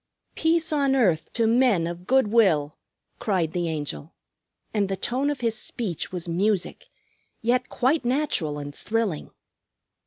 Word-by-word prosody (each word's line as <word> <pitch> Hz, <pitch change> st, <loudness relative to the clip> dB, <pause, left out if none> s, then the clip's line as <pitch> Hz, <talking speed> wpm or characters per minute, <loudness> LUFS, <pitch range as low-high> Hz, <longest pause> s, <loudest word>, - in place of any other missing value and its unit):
"Peace 325 Hz, 0 st, +2 dB
on 280 Hz, -2 st, +2 dB
earth 180 Hz, -12 st, +2 dB
to 230 Hz, -, +1 dB
men 230 Hz, -6 st, +3 dB
of 175 Hz, +1 st, -6 dB
good 265 Hz, -4 st, +3 dB
will!" 170 Hz, -10 st, +3 dB, 0.4 s
cried 180 Hz, -7 st, 0 dB
the 175 Hz, -2 st, -1 dB
Angel, 145 Hz, -, -5 dB, 0.6 s
and 205 Hz, -3 st, +1 dB
the 195 Hz, -, -2 dB
tone 260 Hz, +8 st, 0 dB
of 290 Hz, -3 st, -3 dB
his 230 Hz, -2 st, 0 dB
speech 215 Hz, -6 st, -3 dB
was 180 Hz, -2 st, -4 dB
music, 190 Hz, +2 st, -1 dB, 0.5 s
yet 250 Hz, +3 st, +1 dB
quite 265 Hz, +4 st, +1 dB
natural 245 Hz, -, 0 dB
and 145 Hz, 0 st, -6 dB
thrilling. 215 Hz, -3 st, -2 dB
215 Hz, 145 wpm, -25 LUFS, 170-255 Hz, 0.6 s, men